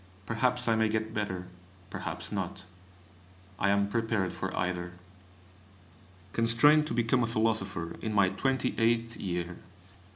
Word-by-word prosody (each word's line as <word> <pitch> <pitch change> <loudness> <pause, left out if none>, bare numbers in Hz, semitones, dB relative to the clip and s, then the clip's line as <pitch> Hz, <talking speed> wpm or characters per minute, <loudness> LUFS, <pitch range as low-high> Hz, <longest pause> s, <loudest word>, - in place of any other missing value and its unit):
Perhaps 125 +3 +1
I 115 - +4
may 110 0 +2
get 110 0 -2
better, 95 -4 -3 0.5
perhaps - - -4
not. 95 - -4 0.9
I 100 - +2
am 100 0 +3
prepared 110 -3 0
for - - -3
either. 90 0 -2 1.4
Constrained 130 +7 +5
to 115 - -2
become 120 +1 +2
a 115 - +1
philosopher 105 -6 0
in 110 - -2
my 100 -3 +4
twenty 130 +7 0
eighth 115 0 +1
year! 90 -2 -3
110 Hz, 130 wpm, -30 LUFS, 95-115 Hz, 1.4 s, Constrained